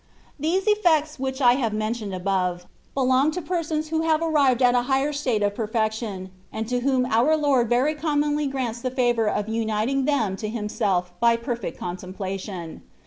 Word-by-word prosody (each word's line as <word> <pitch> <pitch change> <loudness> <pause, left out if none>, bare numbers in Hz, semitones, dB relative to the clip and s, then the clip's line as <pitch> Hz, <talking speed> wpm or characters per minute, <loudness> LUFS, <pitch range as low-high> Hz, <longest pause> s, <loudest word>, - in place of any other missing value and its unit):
Ihese 345 +5 +1
effects 320 -8 +2
which 265 +1 -3
I 245 -2 +6
have 225 -3 0
mentioned 215 -1 -2
above, 180 -1 -1 0.3
belcmg 265 +3 +3
to 360 - -3
persons 310 -2 -2
who 320 0 0
have 320 -1 +2
arrived 280 -6 +3
at 245 0 +5
a 245 - +3
higher 270 +3 +1
fitate 255 -7 0
of 205 - 0
perfection, 215 -3 -2 0.2
and 220 0 -4
to 250 0 0
whom 255 0 +1
our 250 +7 +3
Lord 270 -6 +2
very 255 +5 +2
commonly 295 -1 0
grants 250 -4 -3
the 255 - -1
favour 240 -4 +1
of 205 0 -1
uinting 225 +4 -1
them 220 -10 +1
to 215 - -4
Himself 200 -5 -1
by 235 0 +4
perfect 235 -5 -4
contemplation. 185 -1 -6
245 Hz, 170 wpm, -24 LUFS, 215-290 Hz, 0.3 s, I